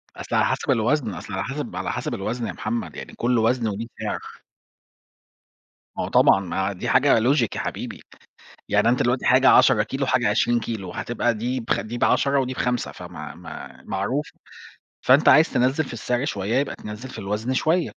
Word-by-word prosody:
أصل - - -5
على - - +4
حسب - - 0
الوزن، 115 0 +1
أصل 100 - -8
على 95 - -2
حسب 135 -6 -5
على 95 - -2
حسب 120 0 -3
الوزن 115 +2 -3
يا - - -3
محمد، 115 +2 -4
يعني - - -8
كل 120 0 +1
وزن 115 +1 +2
وليه 110 +3 -4
سعر. - - -3 1.8
ما - - -1
هو - - -3
طبعًا، 95 - +5
ما 95 +1 -2
دي 90 - -4
حاجة 135 -2 +4
logic 125 +1 +3
يا - - -3
حبيبي، - - -5 0.7
يعني - - +3
أنت 125 +1 +2
دلوقتي 125 +1 0
حاجة 130 +1 +5
10 105 - +6
كيلو، 135 +5 -3
وحاجة 125 -4 +2
20 120 +2 +2
كيلو، 105 -6 -5
هتبقى 120 0 -1
دي 125 +4 -2
بخ 115 - -1
دي 115 +3 -6
ب10 140 +3 +2
ودي 130 0 -2
ب5، 125 -1 -1
فما - - -9
م 80 -3 -11
معروف، 115 +10 -2 0.7
فأنت 135 +4 +5
عايز 155 - +6
تنزِّل 130 +5 +2
في 125 - -8
السعر 120 +3 -1
شويّة، 105 -4 -2
يبقى 140 - -2
تنزِّل 105 +5 -8
في - - -8
الوزن 105 +6 -2
شويّة. 160 +6 +1
120 Hz, 185 wpm, -23 LUFS, 105-130 Hz, 1.8 s, 10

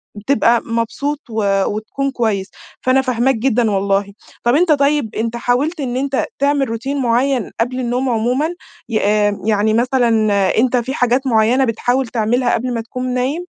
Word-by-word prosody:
بتبقى 235 +1 +2
مبسوط 235 +6 -2
و 220 -1 -2 0.2
وتكون 245 +6 -3
كويس، 210 -6 -1 0.3
فأنا 255 +1 +3
فاهماك 255 0 +1
جدًا 230 -2 +1
والله. 200 0 0 0.3
طب 240 +3 +3
أنت 340 0 +3
طيب، 285 -5 +1
أنت 230 +1 -2
حاولت 275 +8 0
إن 255 -2 -2
أنت 275 0 -1
تعمل 280 -2 +1
روتين 260 +5 -3
مُعين 245 0 +1
قبل 250 +2 -1
النوم 250 +1 -1
عمومًا 245 +7 0 0.4
ي 225 - -3 0.5
يعني 215 0 +2
مثلًا 245 +1 +2 0.5
أنت 250 +2 +3
في 250 +3 -2
حاجات 250 +2 +1
مُعينة 235 +3 +3
بتحاول 245 +3 0
تعملها 240 +2 0
قبل 250 +1 -1
ما 230 - -2
تكون 250 +2 -4
نايم؟ 275 +8 -1
245 Hz, 155 wpm, -17 LUFS, 225-270 Hz, 0.5 s, فأنا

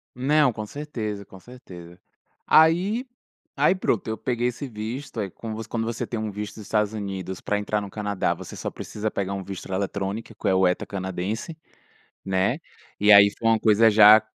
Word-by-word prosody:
Não, 140 +2 +3
com 110 -1 -6
certeza, 110 -6 -5
com 95 - -14
certeza. 90 -7 -13 0.5
Aí 185 +10 +4 0.5
aí - - +4
pronto, 120 - -1
eu 110 - -2
peguei 120 +1 -1
esse 130 +3 -4
visto, 115 +3 -6
aí 100 - -3
como 110 +3 -7
você 110 - -6
quando 115 -1 -2
você 115 0 -3
tem 115 - -4
um 110 -1 -3
visto 105 +1 -6
dos 110 - -9
Estados 105 +1 0
Unidos 95 -3 -5
pra 105 - -1
entrar 105 +1 -1
no 100 - -7
Canadá, 105 -2 -1
você - - -9
só - - -3
precisa 110 0 -4
pegar 100 0 -2
um 95 -1 -4
visto 95 0 -8
eletrônico 100 +3 -3
que - - -4
é - - +3
o 95 -1 +4
ETA 90 - -1
canadense, 100 - -4 0.7
né? 95 0 +1 0.4
E 105 +1 +5
aí 100 0 +9
foi 115 - -1
uma 110 - +3
coisa 110 +1 +5
já 105 +1 +8
105 Hz, 190 wpm, -24 LUFS, 100-115 Hz, 0.7 s, aí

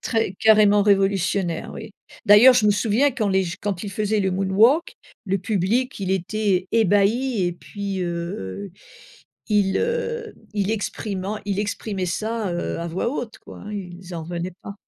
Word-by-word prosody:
Très 225 -5 -1
carrément 210 -2 +5
révolutionnaire 195 -3 +1
oui. 220 -1 -8 0.4
D'ailleurs, 215 +6 +8
je 235 -4 +3
me - - +5
souviens 225 +7 +2
quand 230 -6 -1
les 190 0 +2
j 170 0 -5
quand 195 -3 -3
il 200 - -5
faisait 210 +1 0
le 190 -1 +1
Moonwalk, 200 - +3 0.3
le 195 0 0
public, 215 +6 -1
il 190 -1 -2
était 190 0 0
ébahi 220 +2 +2
et 175 - 0
puis 200 +2 -5
heu, 170 - -5 0.8
il, 205 -3 +2
heu, 470 -1 -2 0.2
il 200 -1 0
exprimant, 205 -1 -3
il 200 -1 -1
exprimait 205 -2 -3
ça, 215 +1 -2
heu, 175 - -3
à 170 - -3
voix 175 +7 -2
haute 240 -5 -5
quoi, - - -12
hein, 210 - -8
ils 180 -2 -8
en 165 - -4
revenaient 175 +1 -5
pas. 200 - -8
200 Hz, 165 wpm, -23 LUFS, 185-220 Hz, 0.8 s, D'ailleurs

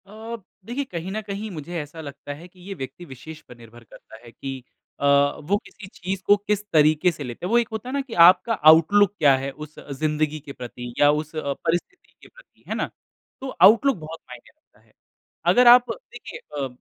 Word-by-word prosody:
अ, 220 +3 -8 0.3
देखिए 245 +6 -3
कहीं 175 +2 -5
न 215 +2 -3
कहीं 210 +1 -6
मुझे 170 +1 -6
ऐसा 150 +2 -10
लगता 145 -1 -8
है 160 +5 -12
कि 180 +1 -24
ये 200 - -5
व्यक्ति 175 +2 -8
विशेष 155 +2 -11
पर 125 - -16
निर्भर 120 0 -15
करता 110 - -16
है 120 - -13
कि 135 +1 -7 0.4
अ, - - -2 0.4
वो 185 +7 +1
किसी 210 -3 -13
चीज़ 190 +2 -5
को 205 - +6
किस 210 -1 0
तरीके 155 +3 +4
से 155 - -8
लेते 125 +5 -7
हैं। - - -3
वो 235 - +5
एक 235 -1 +2
होता 220 +3 -6
है - - -5
ना 280 - 0
कि 265 -4 -10
आपका 185 +6 +5 0.2
आउटलुक 195 +5 +4
क्या 140 -3 +5
है 135 +1 -4 0.2
उस 155 - -22 0.2
ज़िंदगी 155 0 -1
के 145 -1 -11
प्रति 120 -1 -8
या 145 - +6
उस 155 +1 -3
अ, 140 -3 -2
परिस्थिति 175 - -4
के - - -15
प्रति - - -22
है - - -3
ना? - - -2 0.5
तो 265 - -5
आउटलुक 230 +6 +6
बहुत 160 0 -9
मायने 125 -1 -12
करता 310 - -33
है। - - -31 0.6
अगर 245 0 +5
आप 245 +1 +7
देखिए - - -10 0.2
अ, 135 - -1
165 Hz, 215 wpm, -23 LUFS, 145-210 Hz, 0.6 s, आप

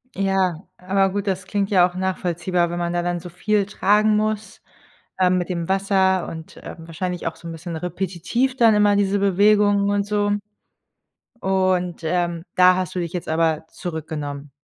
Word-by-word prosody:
Ja, 190 -3 0
aber 195 +1 +1
gut, 205 +1 -3
das 190 -1 -1
klingt 200 0 -1
ja 180 -3 +5
auch 180 - -12
nachvollziehbar, 180 -1 -1
wenn 175 - -3
man 175 0 -2
da 175 0 0
dann 175 0 -1
so 175 +1 -9
viel 200 +3 0
tragen 210 +1 +3
muss, 215 0 -2 0.6
ähm, 185 0 +3
mit 175 - -3
dem 170 -2 -3
Wasser 190 -1 +1
und, 160 -1 -9
ähm, - - -8
wahrscheinlich 175 +2 -4
auch 165 - -3
so 170 - -10
‘n - - -5
bisschen 165 +1 -7
repetitiv 180 +9 -2
dann 230 -3 +5
immer 205 -1 +4
diese 200 0 +1
Bewegungen 200 +1 +3
und 205 0 +1
so. 205 0 0 1.1
Und, 185 -3 0
ähm, 170 0 -1
da 185 -1 +6
hast 185 -3 -3
du 180 - -1
dich 170 -1 -4
jetzt 180 - -5
aber 160 0 +1
zurückgenommen? 150 -4 -6
185 Hz, 175 wpm, -22 LUFS, 175-200 Hz, 1.1 s, da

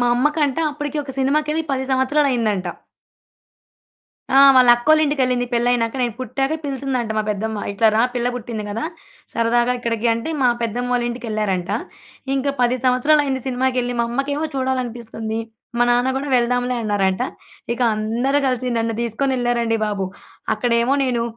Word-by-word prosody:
మా 245 - +2
అమ్మ 245 +4 +2
కంట 290 -3 +1
అప్పడికి 295 0 -5
ఒక 275 - -7
సినిమాకెళ్ళి 300 +4 +1
10 265 0 -1
సంవత్సరాలైందంట. 260 -8 +1 1.6
ఆ! 270 +1 +6 0.2
వాళ్ళ 250 -1 +6
అక్కోళ్ళ 310 +6 +4
ఇంటికెళ్ళింది 255 -4 +1
పెళ్లైనాక, 235 -1 +1
నేను 240 -2 0
పుట్టాక 270 +4 -2
పిలిచిందంట 265 -4 -2
మా - - +2
పెద్దమ్మ. 215 +1 -3
"ఇట్లా 220 +3 +3
రా 225 - +4
పిల్ల 245 0 0
పుట్టింది 230 -3 -5
గదా! 225 +8 -3 0.5
సరదాగా 240 +1 +2
ఇక్కడికి" 235 -1 -1
అంటే 230 +7 -4
మా 250 - +5
పెద్దమ్మోళ్లింటికెళ్లారంట. 230 -5 -2 0.6
ఇంకా 275 +1 0
10 245 +1 +2
సంవత్సరాలైంది 265 +1 +2
సినిమాకెళ్ళి, 250 -1 0
మా - - +2
అమ్మకేమో 285 +5 -1
చూడాలనిపిస్తుంది. 235 -4 -3 0.4
మా - - +5
నాన్న 245 +1 +3
గూడా 275 +2 -3
వెళ్దాంలే 245 +1 +1
అన్నారంట. 195 -3 0 0.5
ఇక 240 - -6
అందరూ 235 +6 0
కలిసి 255 -1 -1
నన్ను 225 0 -1
దీసుకొనెళ్లారండి 240 -1 0
బాబు! 200 -3 -2 0.5
అక్కడేమో 235 +3 +1
నేను 245 -3 0
245 Hz, 135 wpm, -20 LUFS, 230-265 Hz, 1.6 s, ఆ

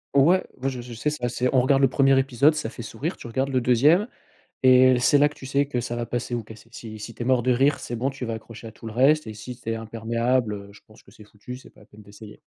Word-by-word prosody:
Ouais, 170 +7 +5
moi, 135 +2 -2
je 125 -2 -6
je 120 0 -10
sais 135 +6 -2
c'est 150 -5 -7
assez 125 +1 0
on 130 - +5
regarde 135 +2 +2
le - - +7
1er 135 0 +3
épisode, 135 +3 +3
ça 115 -6 -4
fait - - -9
sourire, 130 - -5
tu - - -10
regardes 130 +4 -1
le 130 -1 0
2e 145 - +4 0.6
et 130 -1 +6
c'est 145 +3 +4
là 145 0 +4
que 150 - -16
tu 135 - -11
sais 140 +1 0
que 125 -4 -2
ça 120 0 -4
va 120 0 -3
passer 120 +1 -4
ou 115 - -4
casser. 110 +2 -14
Si 110 -2 -9
si 115 +2 -8
tu - - -9
es - - -6
mort 130 -1 +2
de 125 - +2
rire, 135 +4 +2
c'est 120 - -6
bon, 130 +4 -1
tu 135 -2 -6
vas 115 - -3
accrocher 110 0 -11
à - - -9
tout 110 +1 -11
le - - -6
reste 140 +4 +3
et 110 - -6
si 125 +4 -8
tu 115 - -7
es - - -1
imperméable, 115 +1 -1
heu, 100 0 -10
je 100 - -17
pense 110 - -19
que - - -20
c'est 110 0 -15
foutu, 105 +4 -10
c'est 130 - -16
pas - - -21
la - - -18
peine 105 +1 -16
d'essayer. 105 +1 -14
125 Hz, 300 wpm, -24 LUFS, 115-135 Hz, 0.6 s, le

